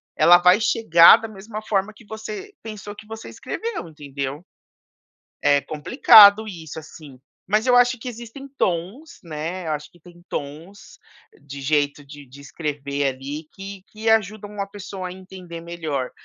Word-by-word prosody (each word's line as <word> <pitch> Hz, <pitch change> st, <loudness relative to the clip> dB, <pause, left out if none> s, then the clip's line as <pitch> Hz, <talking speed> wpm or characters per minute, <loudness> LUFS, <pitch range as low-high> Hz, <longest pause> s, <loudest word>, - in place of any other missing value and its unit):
ela 170 Hz, +3 st, +7 dB
vai 180 Hz, +4 st, +4 dB
chegar 170 Hz, -7 st, +7 dB
da 225 Hz, -, -7 dB
mesma 215 Hz, +1 st, -8 dB
forma 210 Hz, -1 st, -1 dB
que 220 Hz, -, -18 dB
você 385 Hz, -, -8 dB
pensou 210 Hz, -2 st, -8 dB
que 210 Hz, -, -14 dB
você 225 Hz, 0 st, -9 dB
escreveu, 450 Hz, -, -5 dB
entendeu. 145 Hz, 0 st, -6 dB, 1.0 s
É 145 Hz, 0 st, +3 dB
complicado 205 Hz, -, +6 dB
isso 160 Hz, -4 st, -8 dB
assim. 145 Hz, -4 st, -14 dB, 0.3 s
Mas 215 Hz, +5 st, +1 dB
eu 250 Hz, -, +5 dB
acho 245 Hz, 0 st, +4 dB
que 250 Hz, -, -7 dB
existem 240 Hz, +4 st, -9 dB
tons, 190 Hz, -, -3 dB
né, 165 Hz, +2 st, -5 dB
eu 155 Hz, -, -1 dB
acho 150 Hz, 0 st, -5 dB
que 175 Hz, -, -22 dB
tem 175 Hz, -1 st, -17 dB
tons 155 Hz, +8 st, -8 dB, 0.4 s
de 140 Hz, -1 st, -9 dB
jeito 145 Hz, 0 st, 0 dB
de 145 Hz, 0 st, -12 dB
de 135 Hz, +3 st, -15 dB
escrever 140 Hz, -1 st, -4 dB
ali 140 Hz, +4 st, -5 dB
que 195 Hz, 0 st, -9 dB
que 220 Hz, +1 st, -4 dB
ajudam 210 Hz, -1 st, 0 dB
a -, -, -5 dB
pessoa 195 Hz, -2 st, -7 dB
a 180 Hz, -, -8 dB
entender 185 Hz, -3 st, -10 dB
melhor. 160 Hz, -6 st, -4 dB
180 Hz, 160 wpm, -22 LUFS, 150-215 Hz, 1.0 s, ela